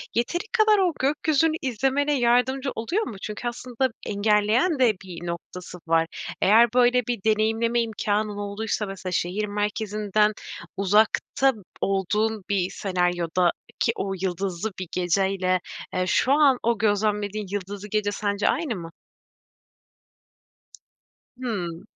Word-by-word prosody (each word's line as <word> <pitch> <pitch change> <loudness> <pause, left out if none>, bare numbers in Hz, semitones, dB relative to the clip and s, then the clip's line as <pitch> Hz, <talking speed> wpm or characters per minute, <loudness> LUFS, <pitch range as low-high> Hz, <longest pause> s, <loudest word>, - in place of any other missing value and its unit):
yeteri 345 - 0
kadar 435 -2 +4
o 360 -4 +2
gökyüzünü 305 +3 +2
izlemene 270 +3 +1
yardımcı 250 +3 +2
oluyor 340 - -1
mu? 220 - -6
Çünkü 215 +3 -5
aslında 250 +2 -2 0.2
engelleyen 215 - +2
de 235 -4 +5
bir 175 -2 -8
noktası 175 +1 -7
var. 165 0 +3 0.3
Eğer 225 +3 +5
böyle 245 -1 +3
bir 235 -6 -2
deneyimleme 225 +2 +2
imkânın 210 -2 -1
olduysa 205 +1 -2
mesela 190 -2 -6
şehir 185 +5 -1
merkezinden 210 0 0 0.4
uzakta 215 +7 +3 0.3
olduğun 210 +2 0
bir 190 -2 +1
senaryodaki 180 -2 0
o 195 0 -2
yıldızlı 190 +2 -2
bir 185 - -4
geceyle, 185 +1 +1 0.3
eee, 185 - 0
şu 260 - +2
an 285 -3 +5
o 235 0 +2
gözlemlediğin 210 -1 0
yıldızlı 205 +1 -5
gece 205 0 0
sence 205 0 -1
aynı 280 -4 -1
mı? 170 -3 -8 2.5
Hımm. 180 -10 -4
210 Hz, 115 wpm, -25 LUFS, 195-240 Hz, 2.5 s, de